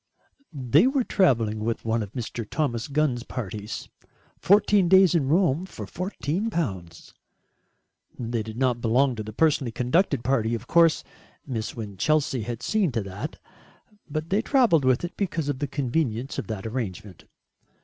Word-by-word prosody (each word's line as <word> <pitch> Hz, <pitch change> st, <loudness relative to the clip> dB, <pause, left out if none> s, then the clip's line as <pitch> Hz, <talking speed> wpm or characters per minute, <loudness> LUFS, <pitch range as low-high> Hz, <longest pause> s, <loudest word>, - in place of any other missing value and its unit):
They 140 Hz, -, +3 dB
were 270 Hz, -1 st, +1 dB
travelling 115 Hz, -, +2 dB
with 115 Hz, +2 st, -3 dB
one 115 Hz, 0 st, +1 dB
of 105 Hz, -1 st, -7 dB
Mr. 120 Hz, -2 st, -4 dB
Thomas 120 Hz, -7 st, -1 dB
Gunn's 145 Hz, -4 st, 0 dB
parties 105 Hz, -4 st, -6 dB, 0.5 s
fourteen 200 Hz, -1 st, +4 dB
days 190 Hz, -2 st, +6 dB
in 155 Hz, -6 st, +1 dB
Rome 170 Hz, +1 st, +2 dB
for -, -, -8 dB
fourteen 185 Hz, +2 st, -3 dB
pounds. 95 Hz, -, -4 dB, 1.0 s
They 115 Hz, -1 st, -2 dB
did 110 Hz, +1 st, -8 dB
not 125 Hz, -2 st, +1 dB
belong 125 Hz, +3 st, +2 dB
to -, -, -3 dB
the 110 Hz, 0 st, -7 dB
personally 135 Hz, -1 st, +1 dB
conducted 125 Hz, -, +1 dB
party 120 Hz, -4 st, +1 dB
of 115 Hz, +1 st, -7 dB
course 165 Hz, +2 st, +4 dB, 0.4 s
Miss 115 Hz, -6 st, -4 dB
Winchelsea 120 Hz, +6 st, 0 dB
had 120 Hz, +2 st, -5 dB
seen 210 Hz, -8 st, +1 dB
to 115 Hz, -3 st, -1 dB
that 100 Hz, +1 st, -6 dB, 0.7 s
but 155 Hz, +3 st, -4 dB
they 200 Hz, +3 st, +3 dB
travelled 235 Hz, -, +3 dB
with 130 Hz, +2 st, +3 dB
it 175 Hz, 0 st, -5 dB
because 165 Hz, -7 st, -2 dB
of 135 Hz, -2 st, -2 dB
the 145 Hz, -, -1 dB
convenience 135 Hz, -2 st, -2 dB
of -, -, -5 dB
that 110 Hz, -3 st, -5 dB
arrangement. 110 Hz, -5 st, -5 dB
130 Hz, 155 wpm, -25 LUFS, 115-165 Hz, 1.0 s, days